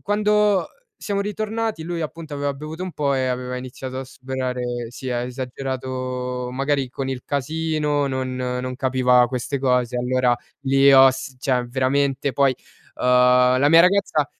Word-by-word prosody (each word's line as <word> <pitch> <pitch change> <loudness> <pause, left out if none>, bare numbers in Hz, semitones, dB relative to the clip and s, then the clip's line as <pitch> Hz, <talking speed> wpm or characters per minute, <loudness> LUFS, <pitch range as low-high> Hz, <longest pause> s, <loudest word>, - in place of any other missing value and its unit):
Quando 210 -2 +2 0.3
siamo 200 -1 -2
ritornati 215 -1 -3
lui, 170 0 -4
appunto, 160 0 -6
aveva 145 0 -2
bevuto 155 +5 -7
un 185 -2 -5
po' 140 -2 0
e 130 -1 0
aveva 125 0 -3
iniziato 130 +1 -7
a 135 - -5
sperare 130 -1 -4 0.3
si 125 +3 -8
è 125 - -1
esagerato 125 -1 -4
magari 135 +1 -1
con 135 +1 -4
il 125 -2 -5
casino, 150 0 -1
non 130 -1 -3
non 125 0 -3
capiva 125 -2 +3
queste 130 +2 -3
cose, 125 -2 +1
allora 125 0 +2 0.3
lì 135 0 +4
ho 135 0 +8
s 130 0 -7
cioè 125 -2 0
veramente 135 +2 0
poi 135 +1 +2 0.4
uhm, - - -6
la 125 +1 +5
mia 165 +2 +7
ragazza 180 -5 +2
130 Hz, 155 wpm, -22 LUFS, 125-150 Hz, 0.4 s, ho